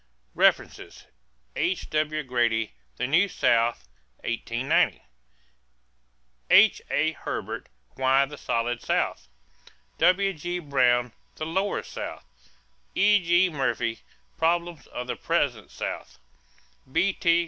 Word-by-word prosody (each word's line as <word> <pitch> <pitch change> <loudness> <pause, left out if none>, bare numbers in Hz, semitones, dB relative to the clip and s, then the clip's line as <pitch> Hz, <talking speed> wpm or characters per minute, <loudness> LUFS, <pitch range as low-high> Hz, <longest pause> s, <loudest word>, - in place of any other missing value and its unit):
=References= - - +1 0.5
H.W. 155 -3 -1
Grady, 120 - 0 0.2
The 125 - -1
New 165 +9 +3
South 115 - +1 0.4
(1890). 115 +3 0 1.5
H.A. 155 +2 +4
Herbert, - - -5 0.2
Why 135 +1 +3
the 150 +2 -10
Solid 120 -3 -2
South. - - -1 0.7
W.G. 180 -2 +2
Brown, 125 -6 +2 0.2
The 155 - -4
Lower 190 +5 -1
South. - - -7 0.7
E.G. 185 -3 +4
Murphy, 125 -5 -1 0.4
Problems 170 -2 0
of 125 - -6
the 125 - -3
Present - - -1
South. - - -6 0.7
B.T. 170 0 +2
150 Hz, 90 wpm, -26 LUFS, 120-175 Hz, 1.5 s, H.A